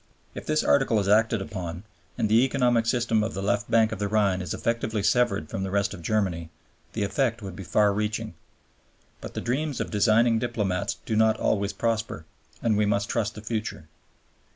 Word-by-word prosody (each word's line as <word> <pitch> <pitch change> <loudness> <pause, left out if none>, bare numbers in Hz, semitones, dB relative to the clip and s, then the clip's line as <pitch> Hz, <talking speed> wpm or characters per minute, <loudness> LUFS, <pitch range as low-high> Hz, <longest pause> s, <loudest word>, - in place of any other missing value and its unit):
If - - -8
this 155 0 +2
Article 135 -6 +3
is 100 - -1
acted 110 0 +3
upon, 90 -4 -6 0.3
and - - +1
the 110 +3 +5
economic 125 -4 +2
system 115 -2 +2
of 110 -1 -3
the 95 - -3
left 105 +1 0
bank 115 -1 +4
of 110 - -5
the 105 - 0
Rhine 100 -3 +1
is 90 - -5
effectively 115 -2 -1
severed 105 -8 +2
from 95 - -4
the 95 - -2
rest 100 +2 0
of 95 - -9
Germany, 85 -4 -1 0.4
the 110 - -1
effect 115 +1 0
would 95 -2 -7
be 95 - -7
far 100 +4 +2
reaching. 105 +1 -2 0.9
But - - -8
the - - -2
dreams 140 +3 -2
of - - -3
designing 110 +2 +3
diplomats 105 -3 -2
do 110 - -1
not 110 0 +3
always 100 -1 +1
prosper, 110 -5 -2 0.4
and 110 -3 +2
we 105 0 +2
must 100 0 0
trust 110 -2 -1
the 105 - -9
future. 110 -6 -4
110 Hz, 195 wpm, -26 LUFS, 100-115 Hz, 0.9 s, the